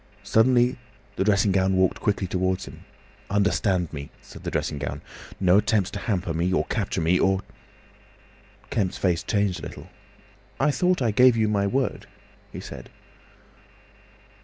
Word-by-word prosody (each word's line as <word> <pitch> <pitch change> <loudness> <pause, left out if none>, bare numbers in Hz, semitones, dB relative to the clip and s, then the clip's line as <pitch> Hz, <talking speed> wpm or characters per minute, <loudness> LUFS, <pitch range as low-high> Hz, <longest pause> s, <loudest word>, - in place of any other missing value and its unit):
Suddenly 120 +2 +3 0.4
the 95 - 0
dressing 100 0 +3
gown 95 0 +2
walked 95 -1 +2
quickly 100 -2 0
towards 95 +1 -1
him. - - -12 0.4
"Understand 100 -3 +1
me!" 70 -1 -6
said - - -14
the - - -3
dressing 70 - -2
gown. 70 - -5 0.4
"No 95 +1 +5
attempts 105 -3 +1
to 100 - -5
hamper 95 -6 -2
me, 85 +3 0
or 95 - +1
capture - - -2
me! 85 +3 +2
Or—" 95 0 +2 1.3
Kemp's 95 -5 -1
face 90 -2 +1
changed 95 0 0
a - - -6
little. - - -11 0.7
"I 145 +2 +3
thought 180 +1 +1
I 115 - +2
gave 125 +2 +5
you 110 -1 +2
my 100 -1 +1
word," 130 +6 -1 0.4
he - - -7
said. - - -9
100 Hz, 155 wpm, -25 LUFS, 90-110 Hz, 1.3 s, No